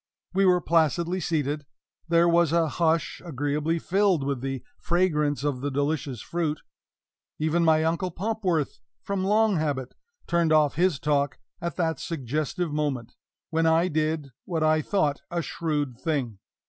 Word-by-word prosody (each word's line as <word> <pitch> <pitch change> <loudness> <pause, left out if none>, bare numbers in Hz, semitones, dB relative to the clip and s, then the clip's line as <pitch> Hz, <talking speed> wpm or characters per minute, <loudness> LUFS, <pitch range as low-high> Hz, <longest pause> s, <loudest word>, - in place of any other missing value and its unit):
We 195 +1 +4
were 180 -1 +4
placidly 170 +2 +2
seated; 150 -4 -1 0.4
there 170 0 +4
was 170 -2 +4
a 165 -1 +3
hush, 165 0 0
agreeably 150 +1 -1
filled 190 -2 +2
with 135 -2 -2
the 135 -1 -3 0.2
fragrance 150 -5 +1
of 140 -4 -1
the 145 - -1
delicious 140 -3 -1
fruit; 160 -3 -2 0.8
even 160 +2 +1
my 160 -1 +4
Uncle 170 +3 0
Popworth, 185 -4 -1 0.2
from 200 -1 -2
long 210 0 +3
habit, 140 -5 -2 0.3
turned 170 -2 +2
off 155 -2 +4
his 175 -1 +2
talk 145 -2 0 0.2
at 170 0 -3
that 160 -5 0
suggestive 155 +3 -2
moment; 135 -6 -2 0.4
when 165 0 +2
I 165 +3 +3
did 155 -2 -1
what 165 -4 -1
I 155 0 +3
thought 150 -5 0
a 170 -1 -2
shrewd 145 -8 -2
thing. 130 -10 -2
160 Hz, 145 wpm, -26 LUFS, 145-170 Hz, 0.8 s, We